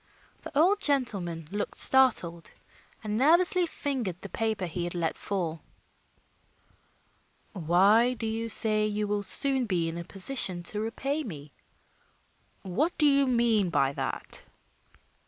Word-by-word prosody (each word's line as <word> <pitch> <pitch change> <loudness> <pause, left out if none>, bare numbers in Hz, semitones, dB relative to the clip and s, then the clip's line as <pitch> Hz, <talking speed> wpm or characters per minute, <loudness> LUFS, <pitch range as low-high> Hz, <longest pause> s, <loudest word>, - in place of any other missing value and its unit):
The 280 - -7
old 385 +7 +3
gentleman 195 - 0
looked 205 +1 -4
startled 200 -11 +3 0.5
and 210 0 -2
nervously 345 +6 +3
fingered 255 - -4
the 200 - -8
paper 220 -3 -2
he 175 +1 -4
had 175 - -5
let 165 -2 -1
fall. 170 -5 -4 1.9
"Why 200 +8 +3
do 230 - -5
you 225 +1 -3
say 215 -1 +2
you 210 0 -2
will 205 0 -1
soon 265 +4 +2
be 175 -4 0
in 165 +1 -5
a - - -5
position 185 -1 -2
to 210 +4 -3
repay 275 +7 -3
me? 150 - -9 1.1
What 270 - -1
do 300 - +2
you 280 -1 +4
mean 235 -6 +2
by 140 -4 +1
that?" - - -5
215 Hz, 135 wpm, -27 LUFS, 175-265 Hz, 1.9 s, you